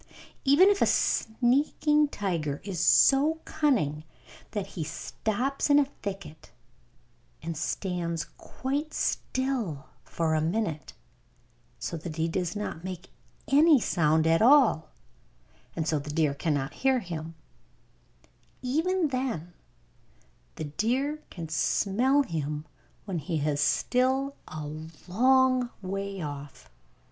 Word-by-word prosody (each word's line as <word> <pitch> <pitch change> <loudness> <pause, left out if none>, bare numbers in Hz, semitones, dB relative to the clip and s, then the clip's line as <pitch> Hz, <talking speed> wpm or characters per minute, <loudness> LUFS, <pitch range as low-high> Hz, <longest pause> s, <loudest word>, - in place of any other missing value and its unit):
Even 285 +7 +6
if 400 - -1
a - - +5
sneaking 285 +6 +2
tiger 165 - -2
is 190 -4 -4
so 285 - +5
cunning 195 - 0 0.5
that 205 -3 -3
he 185 -4 -5
stops 230 - -2
in 285 - +6
a 290 - +5 0.2
thicket 195 -6 -7 0.9
and 165 0 -4
stands 170 0 -2
quite 285 +4 -4
still 240 - -2 0.2
for 165 -1 -1
a 155 - +2
minute, 165 -2 -2 0.8
so 170 - -4
that 160 0 -7
he 160 0 0
does 175 +2 -2
not 205 -5 -5
make 185 0 -7 0.4
any 295 +1 +6
sound 160 -6 +2
at 165 0 +3
all, 235 - +5 0.9
and 160 -2 -2
so 155 -2 +1
the 145 +1 -8
deer 150 -1 +1
cannot 140 -2 -1
hear 265 -1 +2
him, 165 -3 -6 1.3
even 325 +6 +1
then 245 - -3 1.0
the - - -5
deer 250 - -1
can 170 -3 -7
smell 225 - +2
him 150 - -4 0.4
when 190 -5 -3
he 160 +1 -2
is 145 -1 0
still 260 - +1
a 155 -1 -6 0.4
long 255 +4 +3
way 195 +1 -4
off. 145 - -8
195 Hz, 115 wpm, -28 LUFS, 160-265 Hz, 1.3 s, Even